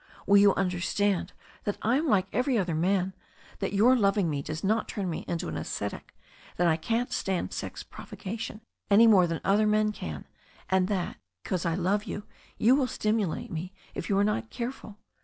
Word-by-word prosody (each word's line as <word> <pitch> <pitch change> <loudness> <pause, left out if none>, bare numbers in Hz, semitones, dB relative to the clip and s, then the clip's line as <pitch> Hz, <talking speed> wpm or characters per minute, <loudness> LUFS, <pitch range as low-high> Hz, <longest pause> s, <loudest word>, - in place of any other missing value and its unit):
Will 200 - +6
you 200 -1 +6
imderstand 185 +1 0 0.3
that 205 - -2
I 230 +4 +3
am 315 +3 0
like 195 -7 +3
every 250 +2 +1
other 180 -5 0
man, 185 +3 +1 0.5
that 195 - -2
your 220 +6 +5
loving 200 -6 +2
me 140 -1 -2
does 155 +3 -5
not 215 +3 +1
turn 200 -3 -3
me 165 - -3
into 170 - -2
an - - -4
ascetic, - - -5 0.4
that 175 - +3
I 160 - +4
can't 230 +9 -1
stand 190 -2 -1
sex - - -5
provocation 220 +2 -7 0.3
any 210 +3 +7
more 195 -6 +6
than 165 -1 -3
other 205 +2 +3
men 215 0 +3
can, - - -6 0.5
and 185 -1 +3
that, 190 -4 -2 0.3
because 180 -2 -1
I 165 - +1
love 190 +3 0
you, 205 - -5 0.3
you 245 +4 +5
will 270 -2 +2
stimulate 215 -7 -1
me 175 +4 -5 0.2
if 170 - -5
you 195 - +2
are 200 - +4
not 115 - -1
careful? 235 -4 -6
200 Hz, 190 wpm, -28 LUFS, 180-215 Hz, 0.5 s, any